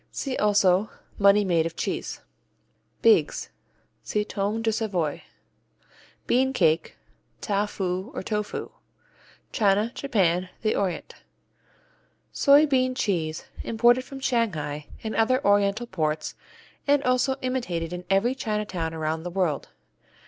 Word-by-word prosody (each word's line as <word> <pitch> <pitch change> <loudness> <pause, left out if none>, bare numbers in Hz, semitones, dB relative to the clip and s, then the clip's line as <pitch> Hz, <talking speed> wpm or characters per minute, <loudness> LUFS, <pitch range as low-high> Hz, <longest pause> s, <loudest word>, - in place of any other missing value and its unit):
Also 200 -2 +4
see - - -23 0.3
Money 200 +1 +6
Made 165 -3 +2
of 165 - -9
Cheese. - - -3 0.8
Beagues 450 -2 +3 0.5
see 210 0 -1
Tome 210 +2 -2
de 225 - +2
Savoie. 190 -9 -1 1.0
Bean 265 +2 +2
Cake, 165 -8 +1 0.4
Tao 205 -1 0
foo, 190 +1 -3
or - - -4
Tofu 210 0 -3 0.8
China, 210 +1 +2
Japan, 185 -9 +1
the 215 - +1
Orient 190 -3 -2 1.2
Soy 285 +2 +6
bean 255 -3 +1
cheese 170 -10 -1 0.2
imported 240 +3 +3
from 270 +1 -9
Shanghai 165 - -1 0.2
and 220 - -3
other 255 +3 +3
oriental 205 +3 +3
ports, 155 -7 -2 0.5
and 285 0 +3
also 255 +1 +2
imitated 180 -11 -2
in 180 0 -5
every 195 +6 +3
Chinatown 210 -9 -3
around 160 0 -2
the 175 - -5
world. 175 -4 -1
205 Hz, 120 wpm, -25 LUFS, 175-240 Hz, 1.2 s, Money